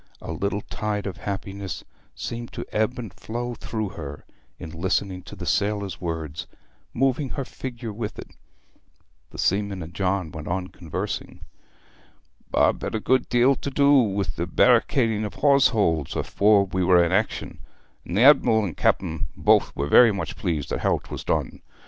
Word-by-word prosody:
A - - -7
little 100 +1 -2
tide 105 -1 -3
of 100 - -4
happiness 100 -1 -5 0.3
seemed 120 0 -5
to - - -5
ebb 110 +3 0
and 115 -5 -6
flow 120 +2 -5
through 110 -3 -4
her 75 -7 -8 0.3
in 80 -3 -8
listening 95 +2 -1
to 90 - -11
the - - -7
sailor's 100 -2 -1
words, 80 -3 -4 0.4
moving 135 +2 +1
her 135 0 -4
figure 120 -4 -6
with 105 0 -5
it. - - -9 1.0
The - - -12
seaman 100 -1 0
and 80 +2 -10
John 95 -3 -1
went 80 -1 -8
on 90 +1 -2
conversing. 85 -4 -5 1.1
'Bob - - +2
had - - -3
a - - 0
good 130 +3 +1
deal 120 +3 +4
to - - -4
do 140 +1 +4
with 100 -7 +2 0.2
barricading 115 -5 +3
the 105 - -2
hawse 140 +3 +4
holes 80 - 0
afore 100 -1 +3
we 95 -1 -1
were 90 -1 +5
in 85 - 0
action, 105 +4 -1 0.4
and 90 - -4
the - - +4
Adm'l 125 -5 +6
and 90 -7 -4
Cap'n 80 -6 0
both - - +4
were 70 - -1
very 115 +9 +7
much 100 -2 -4
pleased 80 -7 -2
at - - -1
how - - +2
'twas - - -7
done. - - -2
100 Hz, 165 wpm, -24 LUFS, 90-115 Hz, 1.1 s, very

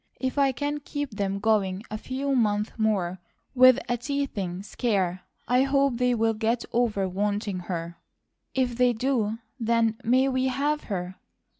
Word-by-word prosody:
If 260 +2 -1
I 275 -1 +4
can 290 +3 -2
keep 290 -1 -4
them 200 -2 -2
going 200 -2 +1
a 215 - -2
few 270 +3 -2
months 210 -3 +1
more 195 -5 0 0.3
with 255 -1 +7
a 245 -1 0
teething 225 -9 -3
scare, 190 -5 -1 0.3
I 250 +1 +4
hope 275 -2 +2
they 250 0 +2
will 225 0 +2
get 225 +2 -1
over 220 -5 +1
wanting 200 +1 -1
her." 170 -1 -4 0.6
"If 250 -3 0
they 250 -1 +4
do, 225 -3 0 0.2
then 230 -1 +1
may 255 +3 +3
we 260 -1 +1
have 290 +3 -1
her?" 185 -2 -4
230 Hz, 155 wpm, -26 LUFS, 205-260 Hz, 0.6 s, with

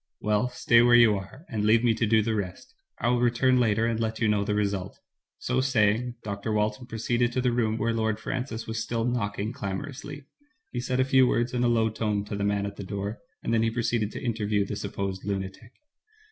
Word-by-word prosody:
"Well, 105 +4 +1
stay 120 -1 +4
where 120 0 +6
you 115 -3 +7
are, 100 - -8
and 110 -4 -2
leave 110 +2 +4
me 120 -2 +4
to 115 0 0
do 110 0 +4
the 115 +1 0
rest. 100 - -5 0.2
I 120 - 0
will 120 0 +2
return 125 +1 +3
later, 110 -2 +2
and 115 -1 0
let 110 -1 -2
you 115 - +2
know 105 -1 +2
the 105 0 -1
result.'* 100 -2 -2 0.4
So 125 +1 0
saying, 120 -1 +1
Dr. 100 +1 -4
Walton 105 +4 -1
proceeded 120 +1 0
to 130 - 0
the 125 -1 +2
room 115 -2 0
where 115 +1 0
Lord 110 -1 0
Francis 120 -2 -4
was 110 0 -3
still 115 +1 -2
knocking 110 -2 -2
clamorously. 140 +8 -6 0.5
He 125 - -3
said 125 +1 -1
a 130 - +4
few 130 -1 +5
words 120 0 0
in 125 0 0
a - - +3
low 115 -1 +2
tone 105 -2 -1
to 105 - -5
the 100 - -2
man 100 0 0
at 100 - -6
the - - -6
door, 100 +2 -4 0.2
and 115 - -1
then 115 - +3
he 115 - +2
proceeded 115 -2 -1
to - - -6
interview 105 -4 0
the 100 - -4
supposed 100 -1 -4
lunatic. 100 +3 -5
110 Hz, 225 wpm, -27 LUFS, 105-120 Hz, 0.5 s, you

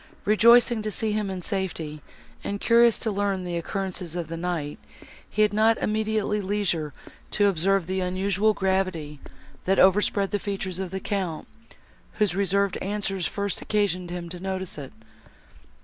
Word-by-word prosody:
Rejoicing 235 +2 +5
to 215 - -2
see 215 +2 -1
him 210 -1 -1
in 185 -2 -5
safety, 165 -7 -3 0.4
and 200 - -3
curious 235 0 +5
to 220 - -1
learn 200 -2 -1
the 175 -1 -3
occurrences 180 0 -3
of 170 -3 -4
the 165 - -4
night, 165 -4 -3 0.5
he 215 - +2
had 210 -1 +2
not 220 +2 +4
immediately 215 -1 0
leisure 190 -6 -1 0.4
to 205 - +2
observe 195 0 +2
the 190 +2 -2
unusual 195 +3 +1
gravity, 185 -6 -1 0.5
that 190 +1 +2
overspread 195 +1 +4
the 205 - 0
features 195 -2 -4
of 190 -2 -3
the 190 +2 -4
Count, 185 -5 -3 0.7
whose 210 -5 +1
reserved 200 0 +1
answers 195 -2 -2
first 200 -1 -2
occasioned 190 -4 0
him 175 -1 -5
to 180 +1 -8
notice 190 -1 -3
it. 140 - -8
195 Hz, 155 wpm, -25 LUFS, 180-210 Hz, 0.7 s, Rejoicing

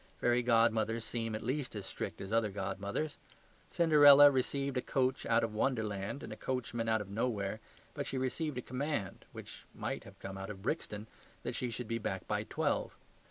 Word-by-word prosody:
Fairy 120 0 +3
godmothers 115 -1 +3
seem 115 -2 -3
at 110 - -5
least 130 +1 -2
as 100 -2 -5
strict - - -5
as 95 +3 -5
other 115 -2 +3
godmothers. 100 +9 -3 0.5
Cinderella 145 -4 +8
received 140 +1 0
a 125 - +1
coach 130 0 0
out 115 0 +3
of 115 -2 -1
Wonderland 110 0 -1
and - - -6
a - - -7
coachman 120 -2 -2
out 110 -1 +2
of 100 - -8
nowhere, 110 -2 -1 0.3
but - - -4
she 135 - -2
received 130 +2 -2
a 125 - -3
command 130 -5 -3
which - - -10
might - - -3
have - - -13
come 95 0 -7
out 95 - -6
of 95 -2 -8
Brixton 110 -6 -2 0.4
that - - -3
she 125 - -2
should 120 0 -5
be 115 0 -1
back 95 -3 -3
by - - 0
twelve. - - -1
115 Hz, 190 wpm, -33 LUFS, 105-130 Hz, 0.5 s, Cinderella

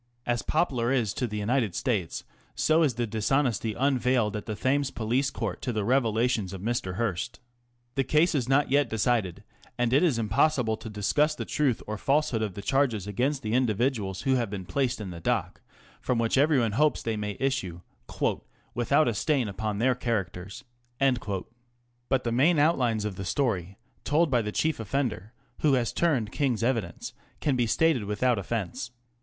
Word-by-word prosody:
As 120 -1 0
Poplar 130 -7 0
is 120 -7 +1
to 125 - -2
the 105 -1 -5
United 110 -2 0
States, 105 -10 -1 0.3
so 160 +1 +3
is 140 -7 +2
the 120 0 -1
dishonesty 115 0 0
unveiled 125 -5 +1
at 105 - -5
the 110 - -3
Thames 140 +4 +1
Police 125 +4 0
Court - - -4
to 125 - -2
the 110 -3 -1
revelations 115 -4 +1
of 95 - -7
Mr. 110 -5 -2
Hearst. 100 -5 -2 0.5
The 135 - +1
case 155 +6 +3
is 130 -4 -1
not 135 0 +3
yet 140 -3 +3
decided, 110 -4 0 0.3
and 120 0 +1
it 140 - +5
is 160 -9 +2
impossible 115 +2 +2
to 110 - -8
discuss 145 +9 +1
the - - -5
truth 140 -6 0
or 110 0 -5
falsehood 140 -5 +1
of 105 -4 -3
the 100 - -7
charges 120 -5 +1
against 130 +7 -1
the 110 0 -2
individuals 115 -5 0
who 135 -1 +2
have 120 -4 +1
been 95 -2 -5
placed 135 +3 -1
in 100 -4 -5
the 85 - -8
dock, - - -1 0.4
from 125 - 0
which 115 -1 +1
everyone 135 -5 +3
hopes 150 +7 +2
they 115 -1 -1
may 105 -1 -4
issue 130 -11 -2 0.5
" 115 - -7
without 135 +5 +2
a 120 - +1
stain 135 +2 +1
upon 105 +1 -3
their 125 +4 +3
characters." 105 -4 -3 0.3
But 120 +1 -3
the 115 - -1
main 145 +8 +3
outlines 125 -8 +2
of 100 -3 -4
the 95 - -4
story, 100 - -1 0.3
told 155 +1 +2
by 120 -2 +3
the 105 -1 -3
chief 160 +5 0
offender, 115 -2 -2 0.3
who 150 -3 +3
has 120 -3 +1
turned 135 -11 +1
King's 130 -6 0
evidence, 115 -9 -2 0.3
can 145 -3 +1
be 120 -2 +1
stated 150 -2 +2
without 110 +3 +1
offence. 100 -1 -3
120 Hz, 180 wpm, -27 LUFS, 105-135 Hz, 0.5 s, it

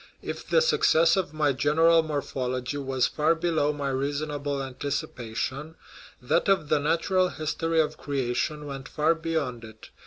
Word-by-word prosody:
If - - -6
the 485 - +4
success 295 - +4
of 190 -6 -1
my 150 -2 +1
General 160 +5 +4
Morphology 130 -3 -3
was 135 -2 0
far 160 +2 +2
below 160 -3 +1
my 145 -2 -3
reasonable 145 +1 -2
anticipation, 135 +1 -4 0.4
that 125 +10 +1
of 170 -7 +2
The - - +3
Natural 170 +5 +1
His 155 -3 -3
tory 165 0 0
of 155 - +1
Creation 140 +2 -2
went 135 -2 -7
far 155 +2 +2
beyond 160 -8 -3
it. 110 -1 -13
150 Hz, 150 wpm, -26 LUFS, 135-165 Hz, 0.4 s, the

